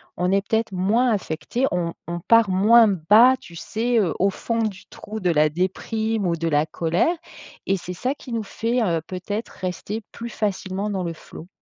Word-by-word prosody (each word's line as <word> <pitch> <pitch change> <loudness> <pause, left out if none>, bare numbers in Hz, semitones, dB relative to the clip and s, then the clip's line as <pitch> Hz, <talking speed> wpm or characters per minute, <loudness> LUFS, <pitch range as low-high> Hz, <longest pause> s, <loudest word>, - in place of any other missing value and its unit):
on 180 +1 0
est 195 - +3
peut-être 225 -1 0
moins 205 +7 +2
affecté. 200 +3 -1
On 170 -2 -1
on 175 0 -3
part 230 +1 +4
moins 220 +5 +6
bas, 210 +8 +5
tu 170 - -13
sais, 230 +7 0
heu, 175 -7 +1
au 195 - +3
fond 230 +4 -3
du 200 -3 -4
trou 215 +1 -8
de 180 -3 0
la 155 -1 +3
déprime 215 +5 -1
ou 170 -1 +1
de 165 - -2
la 150 -1 +2
colère 170 - 0 0.5
et 195 - +2
c'est 180 0 -7
ça 255 +9 -2
qui 255 - -11
nous 225 -2 -1
fait, 230 +4 -1
heu, 170 -6 +1
peut-être 205 +4 -5
rester 185 +4 -5
plus 235 0 -6
facilement 200 -2 -2
dans 195 -3 -2
le 170 -1 -3
flow. 165 +1 -12
195 Hz, 195 wpm, -23 LUFS, 175-225 Hz, 0.5 s, moins